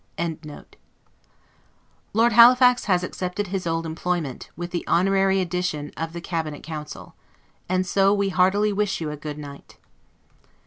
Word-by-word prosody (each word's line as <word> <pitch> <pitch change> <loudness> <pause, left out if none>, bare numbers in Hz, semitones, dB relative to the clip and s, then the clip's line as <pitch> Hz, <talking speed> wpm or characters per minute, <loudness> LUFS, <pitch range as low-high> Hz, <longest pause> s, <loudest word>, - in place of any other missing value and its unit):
] - - -40
sugar 170 -1 -2
plums, - - -27 0.2
etc. - - -26 1.5
Lord 230 +3 +3
Halifax 250 +2 +6
has 180 -3 +2
accepted 185 +3 -4
his 185 -2 -3
old 165 0 -1
employment, 165 -4 -3
with 175 +2 -6
the 175 - -3
honorary 195 +1 +2
addition 180 -5 -2
of 165 0 -5
the 170 - -6
Cabinet 160 -4 -4
Council. 150 -2 -8 0.6
And 185 0 +1
so 195 +1 +3
we 200 -1 +1
heartily 195 +3 +2
wish 205 0 -1
you 155 -2 -4
a - - -5
goodnight. 145 -1 -9
180 Hz, 150 wpm, -23 LUFS, 160-195 Hz, 1.5 s, Halifax